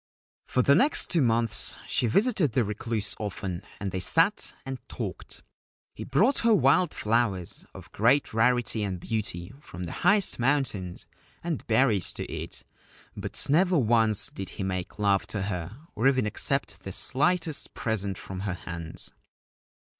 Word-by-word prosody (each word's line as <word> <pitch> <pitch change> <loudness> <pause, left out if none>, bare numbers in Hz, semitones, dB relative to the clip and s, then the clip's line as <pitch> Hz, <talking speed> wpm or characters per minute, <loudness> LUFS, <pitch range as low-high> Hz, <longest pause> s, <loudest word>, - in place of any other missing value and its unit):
For 125 - +1
the 140 - +5
next 280 - +3
two 170 - +3
months 115 -3 +1
she 120 - +1
visited 195 - +2
the 125 - +2
Recluse 105 0 -1
often, 95 -3 -4 0.2
and 100 -2 -3
they 95 - -3
sat 165 - +4
and 135 -1 -5
talked. - - -6 0.5
He - - -7
brought 255 +8 +3
her 230 -2 +4
wild 180 -2 +3
flowers 105 -5 -1
of - - -11
great 125 +6 +2
rarity 120 0 +2
and 95 -3 -3
beauty 95 -2 -4
from 90 -11 -9
the 85 - -5
highest 205 -8 +3
mountains, 120 -9 -1 0.4
and 165 -4 -4
berries 110 -4 +2
to - - -5
eat; - - -6 0.5
but - - -3
never 175 +5 +3
once 110 -5 +3
did 95 - -7
he - - -3
make 95 -1 -4
love 100 -2 +1
to 100 -3 -4
her 95 +1 -4 0.2
or 115 +5 +1
even 130 -4 +3
accept 105 -4 -1
the 95 0 -8
slightest 155 - +1
present 100 -4 -2
from 95 -1 -7
her 95 -2 -3
hands. 85 -2 -5
110 Hz, 155 wpm, -27 LUFS, 95-135 Hz, 0.5 s, the